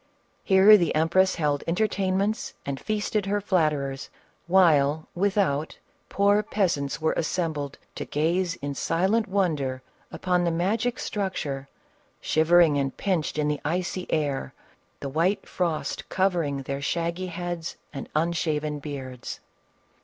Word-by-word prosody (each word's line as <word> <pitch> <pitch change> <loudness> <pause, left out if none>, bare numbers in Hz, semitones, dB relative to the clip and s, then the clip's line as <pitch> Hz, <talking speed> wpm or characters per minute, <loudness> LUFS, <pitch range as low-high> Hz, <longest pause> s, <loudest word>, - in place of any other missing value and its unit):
Here 195 +2 +7
the 175 -4 0
empress 175 +4 +3
held 145 -3 0
entertainments 195 +2 0
and 140 -1 -3
feasted 210 -1 -1
her 205 +1 +1
flatterers, 150 -8 0 0.4
while, 160 -5 +4
without, 185 -6 0 0.3
poor 200 +1 +3
peasants 175 -10 -1
were 160 - +1
assembled 155 -4 -2 0.2
to - - -5
gaze 170 +4 0
in 145 0 -2
silent 190 - +1
wonder 150 -10 0 0.3
upon 180 -1 0
the 175 - +2
magic 215 +9 0
structure, 145 -9 -3 0.5
shivering 160 -2 +4
and 135 -1 -2
pinched 180 -7 -1
in 150 -1 +1
the 150 -1 -1
icy 180 +3 -2
air, 140 - -1 0.5
the - - -3
white 180 +8 0
frost 170 -4 -2
covering 170 -8 0
their 140 +1 -4
shaggy 170 +5 -2
heads 175 -1 -5 0.2
and 135 - -6
unshaven 155 -2 0
beards. 135 -4 -7
170 Hz, 125 wpm, -26 LUFS, 145-190 Hz, 0.5 s, Here